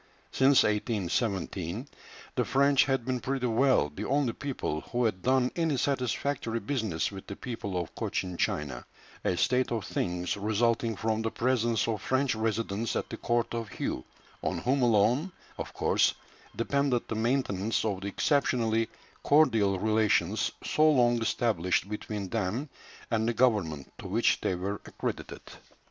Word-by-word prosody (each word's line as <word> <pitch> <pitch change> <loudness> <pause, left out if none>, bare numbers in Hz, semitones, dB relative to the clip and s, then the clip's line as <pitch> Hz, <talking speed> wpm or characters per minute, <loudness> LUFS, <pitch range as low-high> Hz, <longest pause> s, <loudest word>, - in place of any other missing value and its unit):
Since 135 +1 +5
1817 100 - -1 0.5
the - - +1
French 140 0 +4
had 135 -3 0
been 130 -1 -1
pretty 130 +1 -2
well 120 - +3
the - - -5
only 135 -3 +1
people 130 - -3
who 120 0 -1
had 100 -5 -1
done 130 +1 +2
any 165 -5 +1
satisfactory 125 -2 -1
business 110 - -1
with 95 -1 -9
the 100 - -6
people 105 -7 -4
of 85 - -5
Cochin 90 -1 -3
China, 70 -7 -2 0.4
a 90 - 0
state 125 +6 +2
of 115 -3 -2
things 90 0 -2
resulting 110 +2 +1
from 110 +2 -1
the 115 - 0
presence 120 -2 +1
of 110 -3 -1
French 130 0 +1
residents 110 -1 -1
at - - -2
the - - -4
court 120 0 0
of 115 -3 -3
Hué, 65 - -3 0.4
on - - -1
whom 135 +2 +1
alone 120 - +3 0.3
of - - -4
course - - +2 0.4
depended 135 0 0
the - - -3
maintenance 110 -3 0
of 100 -3 -1
the 100 - -4
exceptionally 115 -1 +1 0.3
cordial 115 -10 +4
relations 110 -1 +2
so 155 +1 +4
long 120 -5 +3
established 100 -6 +1
between 105 -1 -4
them 115 +7 -2 0.4
and 110 -1 +1
the 120 - +1
government 95 - +1
to - - -7
which - - +2
they 95 - 0
were 100 +3 -3
accredited. - - -5
115 Hz, 150 wpm, -29 LUFS, 100-130 Hz, 0.5 s, Since